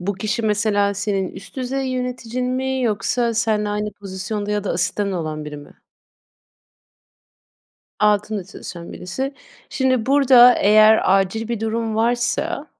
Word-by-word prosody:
Bu 200 +3 -2
kişi, 215 +4 -2
mesela, 205 -1 +1
senin 200 -1 -1
üst 195 - -13
düzey 265 +1 -2
yöneticin 250 -1 -3
mi 260 0 -1
yoksa 230 +2 0
senle 215 -2 0
aynı 210 0 -2
pozisyonda 205 +1 -5
ya 210 -1 -1
da - - -2
asistanın 195 +3 -1
olan 155 -3 -4
biri 150 0 -7
mi? 145 - -14 2.2
Altında 210 -1 +1
çalışan 170 -3 -9
birisi. 265 +10 -4 0.4
Şimdi, 260 -3 0
burada 260 -3 +7
eğer 215 +2 +5 0.2
acil 220 +4 -2
bir 235 -2 -3
durum 225 0 -2
varsa, 245 +7 0
215 Hz, 130 wpm, -20 LUFS, 200-245 Hz, 2.2 s, burada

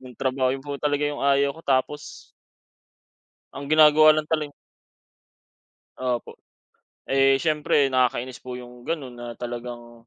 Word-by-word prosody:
Nung 130 -2 -13
trabaho, 130 -1 0
'yon 135 - -13
po 145 -1 -6
talaga 145 0 0
yung 145 0 -3
ayaw 140 0 +2
ko 160 - -14
tapos 140 0 -2 1.3
ang 140 +1 -7
ginagawa 155 +1 +6
lang 155 0 -2
taleng 155 -2 -1 1.5
opo. 125 -2 -3 0.7
Eh, 135 0 +4
siyempre 150 -3 +2
nakakainis 125 0 0
po 125 -1 -8
yung 125 0 -11
gano'n 140 -7 -4
na 120 - -7
talagang 120 -1 -8
135 Hz, 130 wpm, -24 LUFS, 125-145 Hz, 1.5 s, ginagawa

